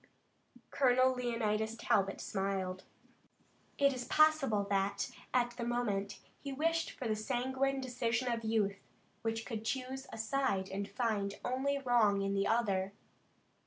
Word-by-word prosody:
Colonel 255 -1 +4
Leonidas 225 -3 -1
Talbot 195 -3 +1
smiled. 190 -2 -2 0.9
It 280 -1 +4
is 250 -1 -4
possible 290 -8 +4
that, 200 0 0 0.2
at 245 -1 +2
the 240 0 -6
moment, 215 -4 -1 0.2
he 280 - -6
wished 330 +4 0
for 250 - -5
the 215 - +1
sanguine 260 +4 0
decision 245 -1 -1
of 230 -1 -2
youth, 210 -3 +1 0.4
which 225 0 -2
could 220 -3 -4
choose 265 +3 -3
a - - -7
side 220 -4 0
and 200 +1 -3
find 210 -5 -1
only 270 +3 0
wrong 235 -7 +3
in 195 0 0
the 195 0 +1
other. 200 -4 +1
230 Hz, 135 wpm, -34 LUFS, 200-260 Hz, 0.9 s, Colonel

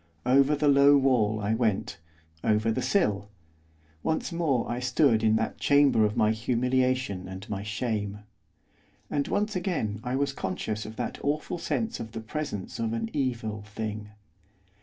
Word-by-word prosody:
Over 140 +3 +4
the 145 +1 +1
low 140 0 +7
wall 120 -6 +2
I 105 +2 0
went, 110 -7 0 0.4
over 110 +1 +2
the 130 - -1
sill, 105 - +1 0.7
once 160 +3 -1
more 155 -8 0
I 120 +1 -2
stood 125 -2 +3
in 110 0 +4
that 110 0 -1
chamber 140 -6 +4
of 105 - -2
my 110 0 +4
humiliation 125 -3 0
and 95 +2 -8
my 100 -1 -2
shame. 105 -1 -3 0.9
And 140 -1 0
once 210 0 -1
again 165 - -1
I 125 +1 -2
was 140 0 0
conscious 105 +1 -3
of 110 - -9
that 120 0 -4
awful 150 +4 -1
sense 225 +6 -2
of 115 0 -7
the 115 - -4
presence 110 -3 -5
of 115 -1 -1
an 115 -1 -3
evil 115 -7 -2
thing. 105 0 -6
115 Hz, 160 wpm, -27 LUFS, 105-140 Hz, 0.9 s, low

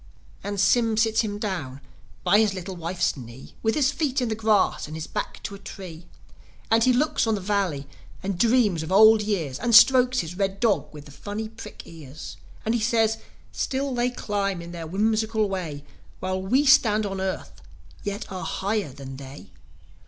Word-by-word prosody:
And 205 0 -3
Sym 225 +3 +3
sits 225 0 +3
him 205 -2 -3
down 175 -11 -4 0.4
by 205 - +5
his 210 -3 +2
little 185 0 -6
wife's 175 +2 -1
knee, 125 -1 -11
With 220 0 +1
his 280 -2 +3
feet 285 -2 -1
in 250 -2 -1
the - - 0
grass 215 -6 +2
and 155 +1 -7
his 160 - -5
back - - -5
to - - -5
a 200 - -9
tree; 175 -4 -10 0.6
And 225 0 +5
he 255 - +5
looks 255 -1 +1
on 220 - +2
the - - -3
Valley 185 -8 -1 0.4
and 190 -2 -3
dreams 225 -6 +3
of 160 +2 -6
old 220 +2 +7
years, 170 -11 -2
As - - -4
he - - +3
strokes 255 -1 +3
his 165 +2 -7
red 195 0 -1
dog 225 -2 +1
with 150 -1 -11
the 145 - -13
funny 205 +8 -5
prick 225 - -10
ears. 155 -3 -10 0.3
And 225 - +1
he 235 - 0
says, 225 -1 +2 0.3
"Still 270 0 -2
they 245 0 +1
climb 200 -6 -2
in 170 0 -8
their 170 -2 -6
whimsical 215 +3 +1
way, 170 -7 -4 0.4
While 185 0 -2
we 255 +10 +2
stand 220 -6 +5
on 195 -1 -3
earth, 190 - -4 0.4
yet 205 0 -5
are 185 -1 -5
higher 200 -5 -2
than 135 0 -9
they. 135 +1 -11
200 Hz, 190 wpm, -25 LUFS, 175-225 Hz, 0.6 s, old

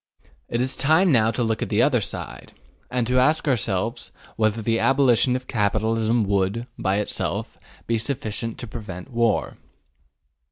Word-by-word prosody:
It 120 - -1
is 130 +1 0
time 160 +5 +3
now 110 -4 +4
to 120 +2 -1
look 110 -1 -1
at - - -2
the 110 +2 +3
other 125 -6 +3
side, - - -7 0.4
and 125 -1 0
to 125 +2 +2
ask 150 +5 +2
ourselves 125 -6 -1 0.2
whether 110 0 +1
the 115 +1 0
abolition 130 -2 +3
of 130 0 -4
capitalism 110 +1 +1
would, 100 +3 0
by 95 +1 0
itself, 105 - -3 0.3
be 115 -1 0
sufficient 115 -2 -2
to 120 - -7
prevent 100 -1 -8
war. 115 -2 0
115 Hz, 155 wpm, -23 LUFS, 110-125 Hz, 0.4 s, now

